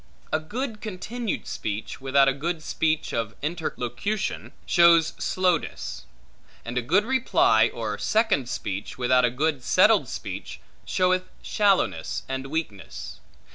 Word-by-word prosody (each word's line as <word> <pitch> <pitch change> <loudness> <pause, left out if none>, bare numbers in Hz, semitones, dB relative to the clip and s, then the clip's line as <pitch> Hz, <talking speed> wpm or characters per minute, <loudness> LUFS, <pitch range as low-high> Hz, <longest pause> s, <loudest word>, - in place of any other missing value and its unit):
A 155 - +3
good 220 - -5
continued 220 +2 -4
speech, 105 +4 -5
without 135 +1 +4
a 135 - +3
good 160 +3 -3
speech 155 0 0
of 115 -2 -2
interlocution, 160 - -3
shows 170 -2 +5
slowness: 175 - -1 0.6
and 120 +1 -5
a 125 - +1
good 180 - +2
reply 225 - +3
or 110 -3 -4
second 215 - +1
speech, 100 -2 -4
without 125 0 +3
a - - +3
good 140 +2 -1
settled - - +4
speech, - - -6 0.3
showeth 185 0 +1
shallowness 200 -2 +1
and 130 0 -4
weakness. 135 - -5
155 Hz, 125 wpm, -25 LUFS, 125-185 Hz, 0.6 s, shows